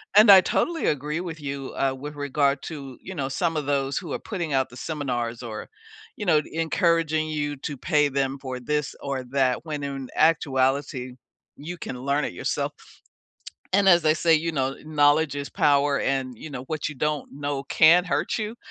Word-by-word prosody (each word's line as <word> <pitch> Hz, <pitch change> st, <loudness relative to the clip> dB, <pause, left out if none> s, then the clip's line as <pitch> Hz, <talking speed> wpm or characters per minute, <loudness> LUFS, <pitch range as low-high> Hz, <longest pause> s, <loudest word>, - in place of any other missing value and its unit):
and 210 Hz, 0 st, +9 dB
I 190 Hz, -, +10 dB
totally 335 Hz, -, 0 dB
agree 150 Hz, +2 st, -1 dB
with 170 Hz, -3 st, -6 dB
you, 140 Hz, -2 st, -5 dB
uh, 135 Hz, -1 st, +1 dB
with 145 Hz, +3 st, -8 dB
regard 140 Hz, -1 st, 0 dB
to, 140 Hz, -5 st, -7 dB
you 190 Hz, -, -8 dB
know, 140 Hz, -6 st, -3 dB
some 165 Hz, +4 st, -1 dB
of 145 Hz, -2 st, -3 dB
those 140 Hz, -1 st, 0 dB
who 170 Hz, -6 st, -8 dB
are -, -, -2 dB
putting 170 Hz, -9 st, -4 dB
out 130 Hz, -1 st, +1 dB
the 125 Hz, -, -13 dB
seminars 120 Hz, -6 st, -3 dB
or, 110 Hz, -2 st, -7 dB, 0.5 s
you 210 Hz, -, -5 dB
know, 155 Hz, -4 st, +4 dB
encouraging 165 Hz, -1 st, +1 dB
you 145 Hz, -1 st, -2 dB
to 140 Hz, 0 st, -5 dB
pay 150 Hz, +1 st, +2 dB
them 135 Hz, 0 st, -1 dB
for 130 Hz, -2 st, -5 dB
this 150 Hz, +3 st, -2 dB
or 135 Hz, -2 st, -3 dB
that, 130 Hz, -1 st, +1 dB
when 150 Hz, -2 st, -4 dB
in 135 Hz, -2 st, -5 dB
actuality 135 Hz, -4 st, +1 dB, 0.4 s
you 170 Hz, +5 st, -7 dB
can 125 Hz, -5 st, -6 dB
learn 140 Hz, +2 st, 0 dB
it -, -, -5 dB
yourself. -, -, -2 dB, 1.0 s
And 195 Hz, +1 st, +4 dB
as 175 Hz, -3 st, +6 dB
they 155 Hz, 0 st, +4 dB
say, 165 Hz, +1 st, +3 dB
you 165 Hz, +2 st, +1 dB
know, 135 Hz, -2 st, -1 dB
"Knowledge 145 Hz, 0 st, +3 dB
is 140 Hz, -1 st, -4 dB
power," 140 Hz, 0 st, +2 dB
and, 130 Hz, -2 st, -1 dB
you 155 Hz, -, -9 dB
know, 125 Hz, -, -6 dB
"What 155 Hz, +1 st, -3 dB
you 150 Hz, -, -7 dB
don't 150 Hz, +1 st, -2 dB
know 145 Hz, 0 st, -3 dB
can 170 Hz, +4 st, +5 dB
hurt 180 Hz, -, -1 dB
you." 220 Hz, +2 st, -4 dB
145 Hz, 195 wpm, -25 LUFS, 135-160 Hz, 1.0 s, I